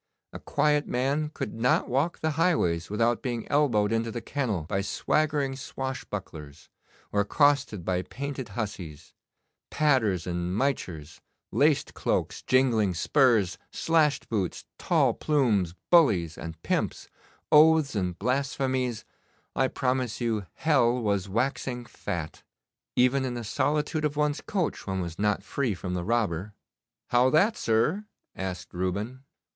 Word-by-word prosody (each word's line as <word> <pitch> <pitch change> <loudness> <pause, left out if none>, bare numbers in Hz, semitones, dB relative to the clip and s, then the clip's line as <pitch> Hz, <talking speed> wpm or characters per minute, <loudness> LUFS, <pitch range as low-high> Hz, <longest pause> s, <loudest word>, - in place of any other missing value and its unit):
A - - -7
quiet 150 -1 +1
man 140 +5 0
could 105 - -5
not 115 +3 +2
walk 140 +7 0
the 160 - +1
highways 145 - +1
without 115 +3 +1
being 120 -4 -3
elbowed 120 -8 +3
into 115 0 0
the 120 - -4
kennel 115 - -2
by 95 +5 -2
swaggering 145 +6 0
swashbucklers, 100 - -6 0.4
or 100 - +2
accosted 140 - +2
by 90 -1 0
painted 135 +2 -6
hussies. 90 -9 -6 0.6
Padders 115 - +2
and 90 +1 -2
michers, 85 - -2 0.3
laced - - +2
cloaks, - - -1
jingling 115 -8 +2
spurs, 110 - +3
slashed 160 -3 +1
boots, 100 -6 -2
tall - - +2
plumes, 110 - +1 0.2
bullies 100 - +4
and 80 -1 -8
pimps, - - -1 0.4
oaths 155 -1 +6
and 90 -3 -1
blasphemies 130 -1 -1 0.5
I 130 - +3
promise 130 -3 -1
you 110 -5 -1
hell 125 -6 +2
was 100 -4 -1
waxing 125 +2 -2
fat. 85 -8 -5 0.5
Even 125 +2 +3
in 125 -2 -3
the 120 - -4
solitude 150 +7 0
of 150 -1 -1
one's 150 0 +1
coach 185 - -2
one 95 -1 -1
was 85 -1 -5
not 105 -2 +1
free 120 -1 -1
from 90 0 -5
the 90 -1 -2
robber.' 105 -2 -1 0.6
'How 125 +1 +5
that, 195 - +3
sir?' 145 - +1 0.3
asked 95 -1 -5
Reuben. 100 +9 -3
120 Hz, 130 wpm, -27 LUFS, 95-140 Hz, 0.6 s, oaths